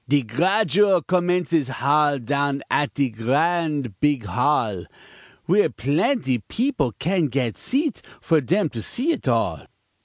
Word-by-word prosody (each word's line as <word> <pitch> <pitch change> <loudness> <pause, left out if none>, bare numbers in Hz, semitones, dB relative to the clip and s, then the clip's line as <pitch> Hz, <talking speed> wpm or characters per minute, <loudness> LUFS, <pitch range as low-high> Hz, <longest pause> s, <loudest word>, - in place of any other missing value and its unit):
De 145 -1 +3
Gradual 190 - +2
Commence 180 -1 0
is 155 -5 +2
hol' 145 +2 +1
Down 140 +3 -1
at 145 - +1
de 140 -4 0
gr'ad 145 - 0
beeg 145 -6 +1
hall, 110 - 0 0.6
W'ere 205 +4 +3
plaintee 140 - 0
peopl' 190 - -1
can 175 -2 0
gat 125 -3 -2
seat 280 -1 -2 0.2
For 160 -2 +2
dem 175 - 0
to 115 - -6
see 265 - 0
it 305 - -4
all. 95 - 0
145 Hz, 135 wpm, -22 LUFS, 125-180 Hz, 0.6 s, De